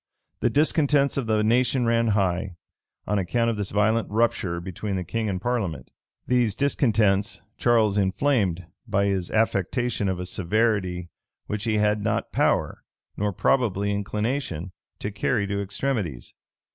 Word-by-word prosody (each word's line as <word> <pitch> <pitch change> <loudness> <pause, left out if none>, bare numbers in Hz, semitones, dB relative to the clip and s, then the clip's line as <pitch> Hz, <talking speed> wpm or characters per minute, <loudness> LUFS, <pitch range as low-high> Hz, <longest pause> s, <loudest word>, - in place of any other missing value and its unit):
The 120 - +2
discontents 145 0 +2
of 135 -4 -2
the 110 -1 +2
nation 125 +3 +2
ran 115 0 +2
high, 95 -3 0 0.5
on 105 -1 0
account 115 +5 +1
of - - -3
this 100 -2 -2
violent 110 +3 +1
rupture 105 -6 0
between 95 +3 -4
the 90 - -2
king 110 +3 -2
and 95 -2 -2
parliament. 95 - -2 0.3
These 120 -5 +2
discontents 105 -8 +1
Charles 110 -4 +3
inflamed 95 - +1 0.2
by 100 -2 +1
his 95 -3 -1
affectation 110 0 0
of 95 -1 -2
a 90 - -4
severity 95 -2 0 0.3
which 105 0 -4
he 110 -2 +1
had 105 0 +1
not - - -1
power, - - +1 0.3
nor 105 0 -1
probably 100 -2 +1
inclination, 105 - -2 0.3
to 105 - -4
carry 100 +2 0
to 100 0 -2
extremities. 100 - -3
105 Hz, 145 wpm, -25 LUFS, 95-115 Hz, 0.5 s, Charles